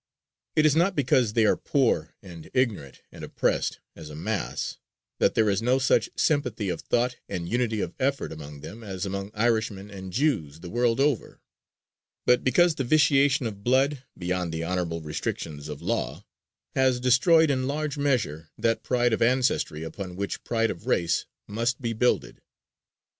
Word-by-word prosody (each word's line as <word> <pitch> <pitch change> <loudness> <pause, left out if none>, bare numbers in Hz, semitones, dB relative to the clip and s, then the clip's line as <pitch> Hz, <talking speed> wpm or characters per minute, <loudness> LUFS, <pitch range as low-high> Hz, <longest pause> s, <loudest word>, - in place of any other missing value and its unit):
It 155 - +4
is 150 -1 +4
not 175 +4 +3
because 125 -5 +2
they 115 -1 +3
are - - +4
poor 120 - 0
and 85 -4 -11
ignorant 110 - -1
and - - -11
oppressed, - - -1
as 75 - -10
a 75 - -9
mass, 100 +6 -3 0.4
that - - +3
there 110 -1 +3
is 100 -1 +1
no 125 +3 +3
such 135 0 +2
sympathy 125 -9 0
of - - -3
thought 125 +1 0
and 90 -3 -4
unity 115 -1 0
of 85 - -3
effort 135 +1 0
among 75 -2 -9
them 105 +10 -9
as 95 -2 -4
among 100 0 -4
Irishmen 110 -3 0
and 95 -2 -8
Jews 90 - 0
the 90 - -8
world 120 +1 +1
over, 140 -3 0 0.9
but 125 - +4
because 175 +6 +4
the 140 - -2
vitiation 140 -1 +3
of 100 -3 -5
blood, 135 +3 +2 0.2
beyond 90 -1 -2
the 80 0 -3
honorable 85 -1 -2
restrictions 75 -1 -4
of 75 -2 -7
law, - - -2 0.5
has 130 -2 +2
destroyed, 140 +6 +5
in 130 -1 0
large 150 0 -2
measure, 115 - -1
that 115 0 +1
pride 120 -2 +1
of - - 0
ancestry 120 - +1
upon 90 +3 -6
which 100 +1 -4
pride 115 -1 +1
of 85 - -10
race 85 -1 +1 0.2
must 115 +4 -1
be 115 -3 -2
builded. 125 +3 0
115 Hz, 170 wpm, -26 LUFS, 90-130 Hz, 0.9 s, destroyed